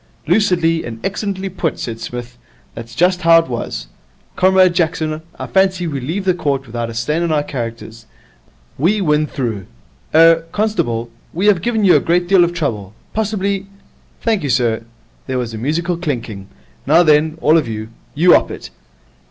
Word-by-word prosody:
'Lucidly 170 -6 +2
and 115 -1 -7
excellently 195 -1 -3
put,' 180 -4 -2
said 115 -2 -5
Psmith. 120 0 -7 0.4
'That 115 - -7
is 115 0 -15
just 180 +5 +2
how 165 0 +6
it 165 - +2
was. 120 - -4 0.5
Comrade 185 -1 +4
Jackson, 160 -2 -1 0.2
I - - -5
fancy 190 -2 +1
we 145 -4 -3
leave 165 +10 -3
the 185 - +3
court 145 -6 -2
without 120 -1 -4
a 115 - -8
stain 150 +9 -1
on 170 -1 0
our 150 -2 +1
characters. 115 -4 -7 0.7
We 190 +9 +2
win 150 -4 +1
through. 115 -9 -4 0.5
Er 165 0 +6
constable, 165 - -1 0.2
we 185 +5 -1
have 200 -5 +4
given 220 0 0
you 185 - +6
a - - +6
great 175 +1 +1
deal 190 -1 +5
of 175 - +1
trouble. 110 - -3 0.2
Possibly 200 -2 -1 0.3
?' - - -35
'Thank 225 -4 +1
you, 145 - -3
sir.' 115 -3 +1 0.4
There 130 -1 -2
was 120 -2 -3
a 110 - -5
musical 165 +7 -1
clinking. 115 - -4 0.4
'Now 165 +5 +6
then, 155 0 +3
all 155 - +4
of 155 -6 +2
you, 110 -1 -5 0.3
you 175 +4 +5
'op - - +4
it. - - -8
160 Hz, 180 wpm, -17 LUFS, 120-180 Hz, 0.7 s, how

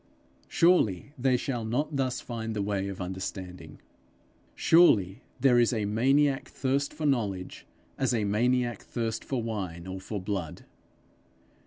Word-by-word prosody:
Surely 145 - +2
they 130 -2 +2
shall 120 -2 -3
not 140 +7 -1
thus 130 -2 -1
find 115 -2 -5
the 105 - -1
way 100 -1 -1
of 100 -1 -6
understanding! 90 -3 -6 0.8
Surely 110 - +4 0.2
there 125 -3 +5
is 120 0 +4
a 110 -4 -1
maniac 135 +6 +2
thirst 140 +1 -1
for 155 - -5
knowledge, 105 -10 -1 0.3
as 135 -1 +2
a 115 -3 +1
maniac 120 +2 +1
thirst 115 -2 -3
for 130 -4 -2
wine 95 -7 -4
or 95 0 -6
for 105 +2 -4
blood! 95 -4 -4
115 Hz, 140 wpm, -28 LUFS, 95-130 Hz, 0.8 s, there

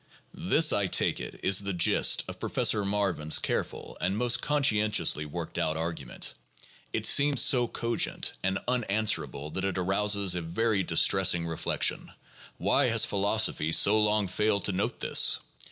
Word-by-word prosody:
This, 165 -3 +2
I 100 -2 0
take - - 0
it, - - -9
is 95 0 +3
the 100 -1 -3
gist 85 - +2
of - - -9
Professor 105 - 0
Marvin's 100 -6 0
careful - - -5
and 95 - -1
most 120 0 +1
conscientiously 105 - +1
worked 75 - -6
out 80 0 -2
argument. 80 -6 -4 0.6
It - - -3
seems 140 -2 +4
so 125 -3 +3
cogent 115 0 -2
and 95 +1 -1
un 125 -1 0
answerable 80 - -2
that 95 - -4
it 95 -1 -2
arouses 100 +1 +1
a 90 - -3
very 100 +5 -1
distressing 85 0 +2
reflection, 80 -1 -2 0.5
why - - +1
has - - +3
phi 100 - -4
losophy 100 -6 0
so 105 +6 +4
long 105 -1 +1
failed 105 +2 -1
to - - +1
note 95 +2 -3
this - - +3
100 Hz, 155 wpm, -27 LUFS, 85-110 Hz, 0.6 s, seems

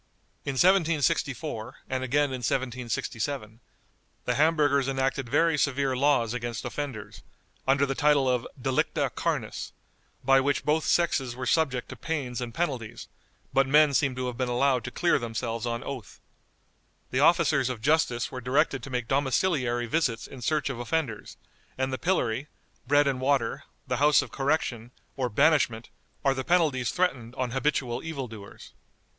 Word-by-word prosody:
In 140 - -2
1764, 150 - +1
and 130 0 -2
again 140 +2 +1
in 130 - -4
1767, 120 -1 -3 0.7
the - - +1
Hamburgers 145 -3 +3
enacted 135 -1 -1
very 160 +3 +3
severe 135 -1 +1
laws 130 -4 +2
against 120 -2 -4
offenders, 110 -8 -5 0.5
under 140 +1 +4
the 135 - -2
title 145 -2 +3
of 125 -2 0
"delicta 130 +1 0
carnis," - - -3 0.5
by 135 +1 +5
which 140 +1 0
both 155 +1 +1
sexes 135 -8 +1
were 130 0 -5
subject 130 -3 +1
to - - -7
pains 135 -7 -3
and 120 -1 -4
penalties, 130 -6 -4 0.4
but 135 0 +3
men 150 +1 +5
seem 135 -1 +2
to 130 0 -3
have 125 -1 -4
been 125 -1 0
allowed 125 0 +2
to - - -3
clear 175 - +2
themselves 115 0 -3
on 120 0 -3
oath. 130 -6 -7 0.9
The 130 - 0
officers 145 -3 +4
of 125 -3 -4
justice 130 -2 +1
were 130 - -6
directed 135 +1 +1
to 135 - -8
make 125 -3 -2
domiciliary 130 -3 +1
visits 125 -2 0
in 130 - -11
search 150 +1 0
of 125 - -7
offenders, 120 -4 -3 0.4
and 130 0 -1
the 130 - -3
pillory, 130 -7 0 0.4
bread 145 +2 +4
and 135 -2 -1
water, 130 -4 0 0.2
the 125 -1 -1
House 145 +2 +5
of - - -11
Correction, 135 -5 -1 0.3
or 130 -2 -1
banishment, 120 -3 +2 0.3
are 135 - +4
the 130 -1 -3
penalties 150 -8 +2
threatened 130 -10 -1
on 130 -3 -2
habitual 135 -2 -1
evil 150 -6 -4
doers. 105 -3 -12
130 Hz, 155 wpm, -27 LUFS, 120-145 Hz, 0.9 s, by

